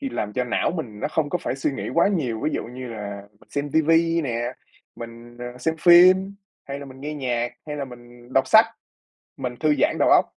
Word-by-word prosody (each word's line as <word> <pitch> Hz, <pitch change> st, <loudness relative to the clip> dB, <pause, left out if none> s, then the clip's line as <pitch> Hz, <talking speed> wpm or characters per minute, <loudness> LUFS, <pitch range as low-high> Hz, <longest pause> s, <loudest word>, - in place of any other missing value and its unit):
khi 275 Hz, -, -3 dB
làm 105 Hz, -, -3 dB
cho 125 Hz, -, -1 dB
não 125 Hz, -, 0 dB
mình 125 Hz, -12 st, -6 dB
nó -, -, -1 dB
không 150 Hz, -2 st, -1 dB
có 180 Hz, -, 0 dB
phải 135 Hz, -, -3 dB
suy 135 Hz, -, 0 dB
nghĩ -, -, -5 dB
quá 170 Hz, +4 st, +4 dB
nhiều, 130 Hz, -, -1 dB
ví 155 Hz, -, +1 dB
dụ -, -, -1 dB
như 125 Hz, +2 st, -8 dB
là 100 Hz, -3 st, -6 dB, 0.2 s
mình -, -, -22 dB
xem 145 Hz, 0 st, -3 dB
ti 160 Hz, -, +4 dB
vi 165 Hz, +1 st, +3 dB
nè, 120 Hz, -6 st, -2 dB, 0.6 s
mình, 115 Hz, +1 st, -10 dB
ờ, 120 Hz, +1 st, -7 dB
xem 160 Hz, +6 st, -1 dB
phim 185 Hz, +3 st, +6 dB, 0.3 s
hay 140 Hz, 0 st, -5 dB
là 140 Hz, -, -8 dB
mình 130 Hz, 0 st, -12 dB
nghe 150 Hz, +2 st, -5 dB
nhạc, 120 Hz, -4 st, -2 dB
hay 150 Hz, -1 st, -5 dB
là 140 Hz, -, -3 dB
mình 120 Hz, 0 st, -14 dB
đọc 135 Hz, 0 st, +3 dB
sách, -, -, +7 dB, 0.7 s
mình 125 Hz, -1 st, -4 dB
thư 155 Hz, -1 st, +3 dB
giãn -, -, +3 dB
đầu -, -, +4 dB
óc. -, -, +6 dB
135 Hz, 235 wpm, -23 LUFS, 120-160 Hz, 0.7 s, sách